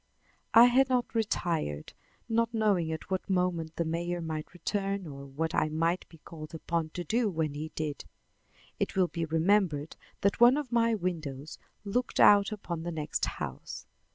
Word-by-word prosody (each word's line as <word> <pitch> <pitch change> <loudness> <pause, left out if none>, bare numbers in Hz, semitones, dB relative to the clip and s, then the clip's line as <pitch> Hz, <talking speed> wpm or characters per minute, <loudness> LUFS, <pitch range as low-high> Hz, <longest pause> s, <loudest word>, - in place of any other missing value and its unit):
I 230 +1 +10
had 260 +2 +4
not 250 -1 0
retired, 170 - -1 0.3
not 230 0 +1
knowing 200 -7 +2
at 160 +4 -6
what 190 +2 -2
moment 180 -4 0
the 170 - -1
mayor 170 +2 -2
might 160 -2 -5
return 195 +2 -2
or 140 -2 -8
what 160 +4 -3
I 155 - +2
might 165 +3 -1
be 165 - -15
called 155 0 -10
upon 165 0 -2
to 175 - -3
do 225 +6 +1
when 160 -5 -1
he 155 +2 -5
did. 150 -2 -4 0.7
It - - -1
will 185 -2 +3
be 165 -1 -2
remembered 160 -2 +1 0.3
that 200 - +1
one 240 +3 +7
of 290 -5 -4
my 230 -1 +3
windows 160 -7 -4 0.3
looked 245 +5 -1
out 205 0 +7
upon 175 -6 -5
the 175 +1 -4
next 155 -2 -2
house. - - -6
175 Hz, 170 wpm, -30 LUFS, 160-205 Hz, 0.7 s, I